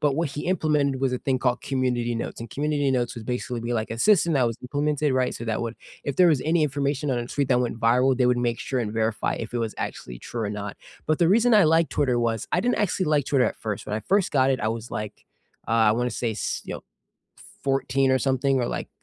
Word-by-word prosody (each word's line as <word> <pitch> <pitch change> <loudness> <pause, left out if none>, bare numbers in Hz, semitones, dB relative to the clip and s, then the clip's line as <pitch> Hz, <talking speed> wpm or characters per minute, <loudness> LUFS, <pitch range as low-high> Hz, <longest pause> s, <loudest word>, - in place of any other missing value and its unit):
but 145 -2 +2
what 165 +1 0
he 145 +2 -6
implemented 150 -6 +1
was 135 -2 +1
a 125 - -2
thing 130 -2 0
called 125 -1 0
Community 125 -3 -1
Notes, 115 - -4
and 115 -1 -7
Community 145 -1 0
Notes 125 -2 0
would 115 -2 -8
basically 125 -1 -3
be 120 +1 -3
like 110 -2 -2
a 115 - -4
system 170 - +4
that 130 -3 +3
was 115 - -3
implemented, 145 +2 0
right, 130 -1 +1
so 120 - -6
that 110 +1 -1
would 115 0 -4 0.3
if 140 - -3
there 180 -1 +6
was 150 -6 +2
any 160 0 +2
information 140 0 -1
on 125 - 0
a 120 - -4
tweet 140 +1 -1
that 125 -2 +3
went 120 -2 -2
viral, 125 +3 +3
they 125 -1 +3
would 125 0 +3
make 120 -1 -1
sure 130 - -2
and 110 -4 -2
verify 110 -1 0
if 115 +1 -6
it 120 - 0
was 115 -2 -2
actually - - -5
true 115 - -5
or 105 - -2
not. 105 -1 -5 0.3
But 155 - +1
the 170 - +4
reason 230 +4 +4
I 205 -3 +6
like 160 +1 +3
Twitter 130 -4 +1
was 115 -2 -1
I - - +3
didn't 245 - +1
actually 185 -3 0
like 150 -3 +2
Twitter 130 -5 +2
at - - -3
first, 105 -3 -5
when 105 - -2
I - - -3
first 195 - +1
got 135 -1 +3
it, 130 - 0
I 110 - 0
was 115 +1 -5
like, 105 -1 -6 0.4
uh, - - -6
I 110 -2 +4
wanna 125 +2 0
say, 115 0 -2
s 105 - -3
you - - -5
know, - - -8 0.8
14 135 -1 +1
or 130 - +3
something 135 +1 +1
or 120 - 0
like - - -4
130 Hz, 265 wpm, -25 LUFS, 115-145 Hz, 0.8 s, there